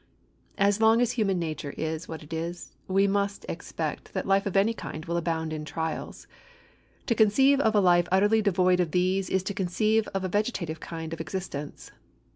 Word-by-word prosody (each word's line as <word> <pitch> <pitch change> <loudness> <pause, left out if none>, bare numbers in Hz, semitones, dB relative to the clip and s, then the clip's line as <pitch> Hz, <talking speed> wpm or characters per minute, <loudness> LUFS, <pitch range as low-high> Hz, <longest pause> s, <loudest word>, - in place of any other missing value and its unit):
As 200 +2 +2
long 225 +1 +5
as 240 -1 +2
human 200 -6 0
nature 155 -4 -4
is 160 +1 -3
what 160 -1 -7
it 150 +2 -10
is, 170 +2 -5
we 195 +1 +3
must 200 0 -1
expect - - -5
that - - -1
life 195 +1 +2
of 195 - 0
any 210 +4 +3
kind 155 -7 -7
will 170 -1 -2
abound 160 -2 -1
in 155 -1 -4
trials. 160 +1 -5 0.8
To 235 - +2
conceive 265 +6 +4
of 220 -5 +2
a - - +6
life 175 -2 +4
utterly 205 +4 +4
devoid 185 -3 +3
of 170 -4 0
these 185 +1 +1
is 190 -1 +1
to 200 - -3
conceive 215 +4 +1
of 195 -1 -3
a - - 0
vegetative 185 -5 -2
kind 165 -1 -6
of 165 - -5
existence. 155 -4 -6
185 Hz, 190 wpm, -27 LUFS, 165-205 Hz, 0.8 s, a